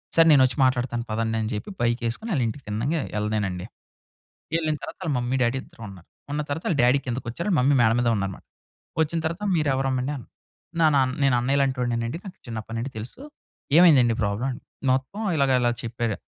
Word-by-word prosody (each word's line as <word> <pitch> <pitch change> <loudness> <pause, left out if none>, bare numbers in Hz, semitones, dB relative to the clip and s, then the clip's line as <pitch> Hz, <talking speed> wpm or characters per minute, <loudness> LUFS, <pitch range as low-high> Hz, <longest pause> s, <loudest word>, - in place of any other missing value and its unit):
సరే 165 - +7
నేనొచ్చి 130 -2 +5
మాట్లాడతాను 125 -2 +1
పదండని 110 0 -1
చెప్పి 105 - -5
బైక్ 120 0 +1
ఏసుకొని 220 - -4
అళ్ళింటికి 125 +1 -1
తిన్నంగా 125 +10 -1 0.2
ఎళ్ళలేనండి. 105 -4 -2 0.9
ఎళ్ళిన 155 -2 0
తరువాత - - -7
వాళ్ళ 160 - -1
మమ్మీ 120 +1 -1
డ్యాడీ 120 +2 +2
ఇద్దరు - - -18
ఉన్నారు 90 -3 -13 0.2
ఉన్న 150 +1 -1
తరువాత 145 +3 -3
వాళ్ళ 170 - +1
డ్యాడీ 125 +3 +5
కిందికొచ్చారు 125 - -4
వాళ్ళ 185 - +3
మమ్మీ 140 +3 +4
మేడ 110 -1 +5
మీదున్నారన్నమాట. 105 -6 -1 0.6
ఒచ్చిన 160 +2 0
తరువాత 170 +6 -3
మీరెవరమ్మా 135 -4 +1
అండి 145 - -2
అన్నారు 160 +6 -3
నా - - +5 0.2
నేను 135 -2 +4
అన్నయ్య 135 +3 +1
లాంటి 135 -1 0
ఒడినె 120 -1 0
అండి 120 - -4
నాకు 190 -1 -9
చిన్నప్పటినుండి 115 +3 -5
తెలుసు. 115 - -8 0.6
ఏమైందండి 135 -10 +6
ప్రాబ్లమ్? 110 +6 -1 0.4
మొత్తం 135 +11 -1
ఇలాగ 140 -3 +2
ఇలా 120 0 +3
చెప్పారు. 115 -2 -2
125 Hz, 170 wpm, -25 LUFS, 115-145 Hz, 0.9 s, సరే